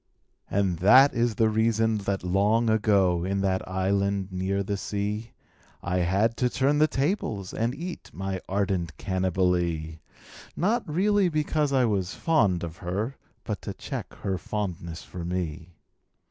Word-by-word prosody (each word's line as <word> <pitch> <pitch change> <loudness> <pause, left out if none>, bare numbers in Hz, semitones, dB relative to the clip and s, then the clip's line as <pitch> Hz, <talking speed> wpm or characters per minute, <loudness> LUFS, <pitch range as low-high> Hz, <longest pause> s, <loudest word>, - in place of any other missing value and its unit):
And 95 -4 0
that 130 +9 +7
is 120 -1 +1
the 110 - +3
reason 110 0 +2
that 95 -2 -1
long 105 +5 +2
ago. 100 -5 +3
In 100 +1 -1
that 95 -1 0
island 100 +1 0
near 95 +2 -1
the 100 +1 -2
sea, 105 +3 -3 0.5
I 90 +1 -1
had 95 +6 +2
to 125 - +2
turn 135 +4 +1
the 155 - +5
tables 135 - -2
and 115 +3 -1
eat 175 +2 -7
My 95 -1 -4
ardent 95 -5 -1
Cannibalee 90 -4 0 0.3
— - - -17
Not 205 -2 0
really 195 +3 +3
because 150 -2 0
I 130 -2 +3
was 95 -5 -1
fond 105 - +2
of 85 0 -6
her, 100 +9 -3 0.3
But - - -4
to - - -6
check - - -6
her 95 -2 -1
fondness 85 -5 -4
for 90 -2 -8
me. 85 -1 -4
100 Hz, 150 wpm, -26 LUFS, 90-115 Hz, 0.5 s, that